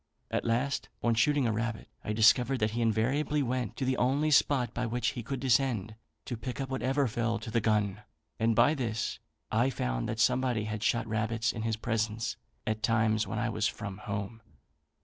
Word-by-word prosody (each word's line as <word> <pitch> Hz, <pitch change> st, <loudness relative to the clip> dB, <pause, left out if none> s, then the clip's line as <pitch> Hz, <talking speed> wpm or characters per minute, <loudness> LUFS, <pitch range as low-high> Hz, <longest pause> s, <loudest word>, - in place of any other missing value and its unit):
At -, -, -1 dB
last, 125 Hz, +5 st, 0 dB
on 120 Hz, -, +3 dB
shooting 140 Hz, +4 st, +3 dB
a 115 Hz, -, +2 dB
rabbit, 110 Hz, +1 st, -3 dB, 0.2 s
I -, -, -3 dB
discovered 120 Hz, +4 st, +4 dB
that 105 Hz, -2 st, 0 dB
he 120 Hz, +2 st, -2 dB
invariably 130 Hz, +7 st, +1 dB
went 125 Hz, -3 st, -2 dB
to 130 Hz, -, -1 dB
the 130 Hz, 0 st, +1 dB
only 140 Hz, +5 st, +2 dB
spot 135 Hz, -4 st, +3 dB
by 125 Hz, 0 st, -1 dB
which 120 Hz, +2 st, 0 dB
he 120 Hz, -, -5 dB
could 135 Hz, +3 st, -4 dB
descend 120 Hz, -5 st, +1 dB, 0.3 s
to 120 Hz, -, -3 dB
pick 120 Hz, +4 st, -6 dB
up 135 Hz, -1 st, -3 dB
whatever 130 Hz, +1 st, +1 dB
fell 115 Hz, 0 st, -1 dB
to 115 Hz, +1 st, -7 dB
the 115 Hz, 0 st, +2 dB
gun; 105 Hz, -2 st, +1 dB, 0.4 s
and 115 Hz, 0 st, +2 dB
by 150 Hz, -, +5 dB
this 115 Hz, -6 st, -2 dB, 0.3 s
I 120 Hz, +4 st, +3 dB
found -, -, -2 dB
that 110 Hz, -, -3 dB
somebody 125 Hz, -1 st, +2 dB
had 105 Hz, -1 st, -4 dB
shot 115 Hz, +1 st, +1 dB
rabbits 110 Hz, +1 st, 0 dB
in 110 Hz, -, -5 dB
his 115 Hz, 0 st, 0 dB
presence 110 Hz, 0 st, -1 dB, 0.3 s
at 110 Hz, 0 st, -1 dB
times 110 Hz, -2 st, +2 dB
when 105 Hz, +3 st, -3 dB
I 115 Hz, +2 st, 0 dB
was 110 Hz, -1 st, 0 dB
from 100 Hz, -1 st, -6 dB
home. 100 Hz, +2 st, -5 dB
115 Hz, 195 wpm, -30 LUFS, 110-125 Hz, 0.4 s, by